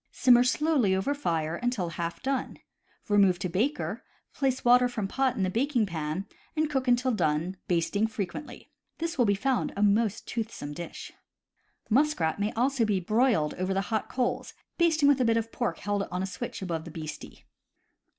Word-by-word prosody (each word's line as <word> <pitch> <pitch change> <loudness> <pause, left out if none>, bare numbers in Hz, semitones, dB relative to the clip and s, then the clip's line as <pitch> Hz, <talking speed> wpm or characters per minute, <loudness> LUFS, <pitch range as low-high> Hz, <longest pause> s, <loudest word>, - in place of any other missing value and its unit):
Simmer 245 -1 +5
slowly 250 -6 +2
over 190 +9 0
fire 165 - -1
until 245 -8 -1
half 170 +4 -5
done. 270 -1 -2 0.5
Re 205 -1 +3
move 190 -3 +5
to 175 - -2
baker, 245 - -1 0.3
place 265 -2 -1
water 245 +1 +6
from 220 -5 -3
pot 260 +3 0
in 195 - -1
the 185 - +1
baking 245 +1 +1
pan, 160 0 -3 0.3
and 310 -1 0
cook 265 -2 -1
until 245 +1 +3
done, 170 -2 0
basting 185 +5 +1
frequently. 220 +5 -6 0.3
This 335 -2 -3
will 245 - +5
be 200 -1 +3
found 260 +4 0
a 205 - +2
most 210 +1 +2
toothsome 220 -10 -4
dish." 170 +2 -8 0.8
Muskrat 235 - +2
may 205 +1 0
also 255 +1 +1
be 210 -3 +1
broiled 215 - +2
over 185 +1 -1
the 195 - +2
hot 220 - -1
coals, 250 -2 -2 0.2
basting 320 -4 +4
with 285 -2 +4
a - - +3
bit 230 0 +3
of 225 0 -2
pork 240 - -2
held 205 -1 -2
on 180 +1 -2
a - - 0
switch 190 0 -6
above 165 -3 -3
the 165 - -9
beastie. 155 -1 -8
220 Hz, 180 wpm, -28 LUFS, 185-255 Hz, 0.8 s, water